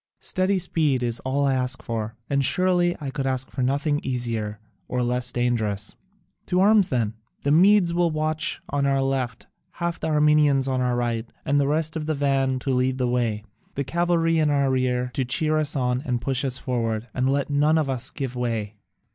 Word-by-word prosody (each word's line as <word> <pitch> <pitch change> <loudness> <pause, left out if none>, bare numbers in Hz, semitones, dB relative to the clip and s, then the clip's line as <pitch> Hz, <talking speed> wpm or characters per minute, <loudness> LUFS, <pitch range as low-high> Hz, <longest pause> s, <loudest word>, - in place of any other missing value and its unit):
Steady 190 +1 +1
speed 155 -7 0
is 120 -1 -1
all 140 +2 0
I 135 - +2
ask 130 0 -2
for, 110 -1 -4
and 140 -1 +1
surely 180 +3 +3
I 140 -3 -5
could 135 -1 -2
ask 130 0 -2
for 130 - -4
nothing 145 +3 +1
easier 115 -5 -3 0.3
or 125 -1 -1
less 125 0 0
dangerous. 110 -4 -1 0.5
To 180 -1 +1
arms 205 0 +5
then! 115 -5 0 0.3
The 140 - +1
Medes 180 +2 +5
will 175 0 +2
march 155 0 -1
on 140 -1 0
our 135 0 +2
left, 130 -3 -2 0.3
half 170 -1 -3
the - - -3
Armenians 150 -3 +3
on 130 -1 0
our 125 -1 +1
right, 120 -1 -2
and 145 +1 +2
the 140 - +2
rest 155 +2 0
in 155 -1 -3
the 155 0 -1
van 135 -2 +1
to 135 - -1
lead 130 0 +1
the 125 -1 0
way, 120 -4 -1 0.3
the 140 - -1
cavalry 165 +3 +1
in 155 -1 +2
our 140 -2 +2
rear, 125 -1 0
to 135 - 0
cheer 155 +5 +1
us 150 -1 0
on 125 -1 0
and 125 -2 -1
push 130 +2 -2
us 130 -2 0
forward 115 -3 -2
and 130 +1 0
let 140 +1 0
none 150 +3 +3
of 155 -3 +1
us 130 -2 -1
give 135 -3 -5
way." 115 -4 -3
135 Hz, 200 wpm, -24 LUFS, 125-155 Hz, 0.5 s, arms